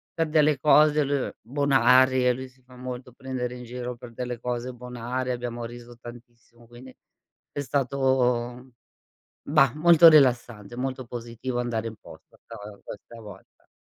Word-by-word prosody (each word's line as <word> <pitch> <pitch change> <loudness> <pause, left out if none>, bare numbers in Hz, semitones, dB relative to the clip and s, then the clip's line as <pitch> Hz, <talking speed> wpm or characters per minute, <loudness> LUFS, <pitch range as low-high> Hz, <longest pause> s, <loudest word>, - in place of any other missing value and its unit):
per 165 -1 0
delle 150 -2 +3
cose 150 0 +5
lui 140 -1 -1
bonarie. 130 -1 +3
Lui 130 +1 -7
si 130 0 -28
fa 125 0 -18
molto 125 0 -7
prendere 125 -1 -5
in 125 - -9
giro 125 0 -6
per 120 0 -12
delle 125 0 -5
cose 125 +1 -4
bonarie. 125 +1 -5
Abbiamo 120 -1 -5
riso 120 0 -11
tantissimo, 120 0 -14
quindi 125 +2 -14 0.6
è - - -6
stato 130 -2 0 0.7
bah, 140 -4 +3
molto 170 +1 +7
rilassante, 120 -7 +2
molto 130 0 -4
positivo 120 +1 -5
andare 115 -2 -2
in 110 - -8
posta - - -16
'sta - - -12 0.3
questa 115 +3 -11
volta. 100 -3 -15
125 Hz, 145 wpm, -25 LUFS, 120-130 Hz, 0.7 s, molto